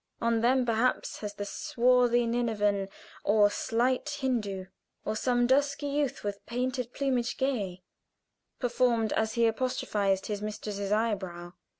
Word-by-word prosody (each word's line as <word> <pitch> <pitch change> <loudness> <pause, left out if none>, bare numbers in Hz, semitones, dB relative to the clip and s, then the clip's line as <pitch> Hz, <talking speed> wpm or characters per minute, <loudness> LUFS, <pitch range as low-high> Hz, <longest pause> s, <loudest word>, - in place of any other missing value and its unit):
On 230 -1 +1
them, 255 +2 +3
perhaps, 235 +2 0
has 205 -1 -5
the 205 - -4
swarthy 245 +2 +2
Ninevan, 210 -4 0 0.3
or 205 0 +4
slight 250 +7 0
Hindoo, 210 -8 -1 0.4
or 215 - -1
some 245 +1 +2
"Dusky 285 +3 +2
youth 285 -1 -1
with 200 -1 -4
painted 250 0 -2
plumage 255 -4 -1
gay" 200 -9 -2 0.7
performed 240 -3 +1
as 220 0 0
he 235 0 +3
apostrophized 210 -5 0
his 205 -1 -3
mistress's 210 -1 -4
eyebrow. 190 -6 -1
230 Hz, 125 wpm, -29 LUFS, 205-250 Hz, 0.7 s, or